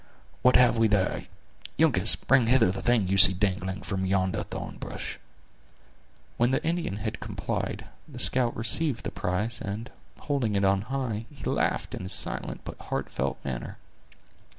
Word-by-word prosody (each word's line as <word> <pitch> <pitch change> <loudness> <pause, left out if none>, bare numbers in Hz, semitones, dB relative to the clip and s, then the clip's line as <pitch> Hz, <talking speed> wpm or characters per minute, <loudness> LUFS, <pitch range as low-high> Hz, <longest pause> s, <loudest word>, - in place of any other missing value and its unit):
"What 125 - +5
have 120 -2 +5
we 115 - +5
there? 105 -3 0 0.5
Uncas, 115 - +4
bring 130 -4 +2
hither 115 -5 +4
the 100 - -5
thing 120 -5 +2
you 95 +1 +1
see 95 +1 +9
dangling 95 0 -2
from 95 -2 -3
yonder 95 -1 0
thorn - - -7
bush." - - -6 1.2
When 120 +1 +3
the 135 - 0
Indian 165 - -1
had 110 +1 -4
complied, 105 -4 -4 0.2
the - - -11
scout 125 -2 +3
received 120 +4 +1
the - - -4
prize, 105 +7 -2
and 105 +5 -5 0.3
holding 130 -8 -1
it 100 0 +2
on 95 0 +3
high, 120 -5 -3
he 140 - -13
laughed - - -1
in - - -5
his 95 +1 -3
silent 95 - -2
but - - -8
heartfelt - - -3
manner. 60 -3 -5
110 Hz, 160 wpm, -27 LUFS, 95-125 Hz, 1.2 s, see